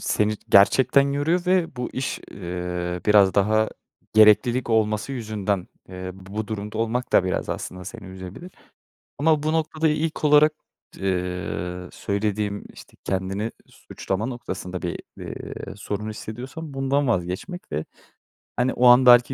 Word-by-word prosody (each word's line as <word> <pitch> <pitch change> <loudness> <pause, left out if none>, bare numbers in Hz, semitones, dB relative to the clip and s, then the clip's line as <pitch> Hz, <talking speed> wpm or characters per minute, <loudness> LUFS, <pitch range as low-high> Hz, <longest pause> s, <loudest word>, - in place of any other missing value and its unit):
seni 105 0 +1
gerçekten 130 +7 +5
yoruyor 165 +6 0
ve 180 -6 +2
bu 125 0 -3
iş, 130 - -2
eee, 90 -1 -4
biraz 100 -3 +6
daha 110 +2 +3 0.4
gereklilik 115 +4 +5
olması 110 +3 +1
yüzünden, 105 -6 -2 0.2
eee, 90 0 -6
bu 100 +3 -6
durumda 105 0 -4
olmak 120 +2 -1
da 95 - +5
biraz 95 - -2
aslında 90 0 -5
seni 105 0 -9
üzebilir. 95 - -9 0.7
Ama 155 0 +3
bu 155 +1 0
noktada 160 0 +1
ilk 155 +1 -1
olarak 150 +1 +6 0.4
d - - -13
eee, 90 -1 -3
söylediğim 100 0 -2
işte - - -15
kendini 95 +3 -2 0.2
suçlama 95 +3 -4
noktasında 95 -7 -5
bir, 85 - -3 0.2
iii, - - -7
sorun 105 +1 -4
hissediyorsan 130 +8 -7
bundan 135 0 +1
vazgeçmek 95 - -3
ve 75 +2 -1 0.7
hani 125 +1 +2
o 125 - +2
an 125 +1 +8
belki 120 +1 +7
110 Hz, 135 wpm, -24 LUFS, 95-135 Hz, 0.7 s, an